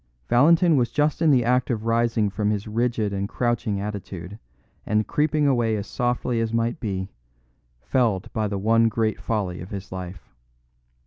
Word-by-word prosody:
'" - - -41
Valentin 165 +6 +5
was 120 -2 +2
just 150 +1 0
in 165 - +4
the 125 -5 +4
act 125 +1 +2
of 115 -3 -2
rising 115 -2 +2
from 105 +1 -1
his 105 0 -2
rigid 110 -2 -1
and 100 +1 -2
crouching 120 -4 -1
attitude 100 -2 -6 0.4
and 105 0 +1
creeping 150 0 +1
away 120 -5 +2
as 100 -1 -3
softly 120 -1 -1
as 115 -1 -1
might 115 +1 -1
be, 95 -4 -4 0.7
felled 110 - +1
by 110 -2 0
the 100 -1 -3
one 115 +3 +3
great 110 -1 -1
folly 95 -6 -2
of 90 - -8
his 100 -1 -7
life. 90 -4 -8
115 Hz, 175 wpm, -24 LUFS, 100-120 Hz, 0.7 s, Valentin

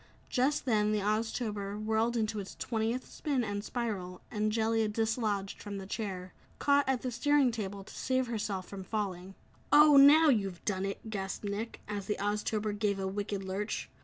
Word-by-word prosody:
Just 270 +3 +1
then, 215 -4 +2
the 215 - +1
Oztober 210 -1 -1
whirled 220 +2 +1
into 215 -1 -1
its 195 - -7
twentieth 230 +2 -2
spin 275 -5 -1
and 205 -2 -3
spiral, 205 -7 -4
and 215 -1 0
Jellia 225 0 +2
dislodged 215 -2 -1
from 205 -1 -5
the 195 - -6
chair 190 -3 -5 0.2
caught 285 -1 +3
at 260 -2 0
the 255 - -2
steering 275 +1 +3
table 200 -3 -5
to - - -13
save 260 0 0
herself 210 -5 -3
from 195 -1 -7
falling. 190 -2 -4 0.4
"Oh, 295 -1 +8
now 300 +3 +8
you've 195 -8 0
done 195 -2 0
it!" 205 +2 -6
gasped 195 0 -4
Nick, 205 +3 -4
as 200 -2 -4
the 210 - -1
Oztober 210 +1 -1
gave 205 -1 0
a 195 - -2
wicked 200 0 -3
lurch. 195 +3 -3
215 Hz, 175 wpm, -31 LUFS, 200-235 Hz, 0.4 s, Oh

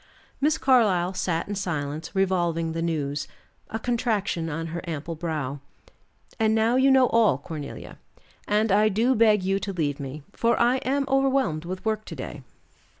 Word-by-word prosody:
Miss 305 +2 +3
Carlyle 200 -9 +3
sat 175 -3 -1
in 205 - -3
silence 155 -4 -4
revolving 175 -4 +1
the 165 0 -3
news, 150 -4 -2 0.4
a 225 - -3
contraction 220 -8 -1
on 165 +1 -3
her 170 - -3
ample 160 +1 -4
brow. 155 -4 -3 0.8
"And 220 0 +3
now 225 +2 +2
you 265 +1 +4
know 265 -1 +6
all, 225 - +4
Cornelia, 145 0 -8 0.5
and 210 +1 +2
I 210 +2 +4
do 225 +6 +2
beg 215 -4 +4
you 195 +1 +1
to 200 - -4
leave 155 -5 -2
me, 140 +1 -6
for 235 0 +1
I 245 +2 +4
am 275 +2 0
overwhelmed 270 - +1
with 185 +1 -6
work 215 -1 -1
to 165 - -7
day." 140 +1 -7
190 Hz, 165 wpm, -25 LUFS, 160-225 Hz, 0.8 s, know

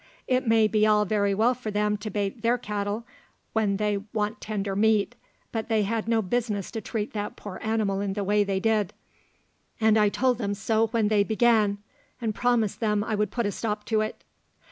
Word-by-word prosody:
It 255 0 +1
may 225 -1 +5
be 215 0 +3
all 210 -1 +4
very 200 -1 +1
well 230 +5 +3
for 245 -3 -6
them 210 0 +1
to 210 +1 -6
bait 205 +2 -3
their 235 +2 +2
cattle 210 +1 -3 0.5
when 210 -3 +1
they 210 0 0 0.2
want 210 -1 -2
tender 200 -2 -3
meat, 215 +2 +2 0.4
but 225 -1 -3
they 220 -2 +2
had 220 +2 -2
no 225 -1 +2
business 210 -1 -2
to 225 - -4
treat 215 -2 -4
that 205 -1 -4
poor 200 -3 -8
animal 215 -3 0
in 200 -1 -2
the 205 0 -2
way 205 +1 +3
they 195 -1 -1
did; 215 -2 +1 0.9
and 220 -1 +4
I 210 -1 +4
told 250 +3 +1
them 205 -3 -1
so 220 +2 +1
when 225 -1 +1
they 210 -2 +4
began, 220 -2 +3 0.4
and 225 -3 -2
promised 235 -3 +1
them 210 -2 +1
I 220 - -3
would 210 -1 +1
put 235 +2 -2
a 205 - 0
stop 210 0 -3
to 215 - +4
it." 215 - -4
215 Hz, 205 wpm, -26 LUFS, 205-225 Hz, 0.9 s, may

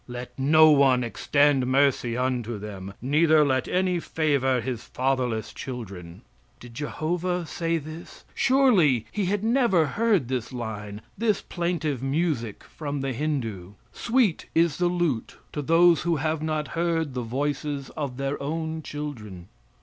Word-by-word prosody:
Let 125 0 -7
no 155 +3 +6
one 135 -3 +4
extend 140 +2 +2
mercy 130 -3 +2
unto 125 -3 -1
them, 100 -2 -8
neither 155 +3 +4
let 130 -2 0
any 180 -1 +1
favor 140 -6 +1
his 120 -1 -4
fatherless 125 -4 -1
children." 95 -9 -8 0.4
Did 120 -1 -12
Jehovah 170 +6 -2
say 165 +1 -1
this? 155 +2 -10
Surely 205 - +3
He 205 -2 -1
had 200 +2 -1
never 230 -8 +3
heard 200 - +1
this 125 -1 -3
line 105 -4 -6 0.2
this 215 -3 +1
plaintive 170 -7 -2
music 135 - -1
from 145 -3 -5
the 135 -1 -2
Hindoo: 115 - -3 0.2
"Sweet 235 -7 +1
is 165 -2 +3
the 180 - +2
lute 175 -9 -1 0.2
to 150 - -2
those 165 +3 +4
who 170 -1 +1
have 155 +1 -1
not 155 -2 -2
heard 165 -4 -1
the 125 - -2
voices 140 +3 -3
of 140 -5 -5
their 140 +1 -3
own 160 +2 -3
children." 110 - -7
145 Hz, 140 wpm, -25 LUFS, 125-165 Hz, 0.4 s, no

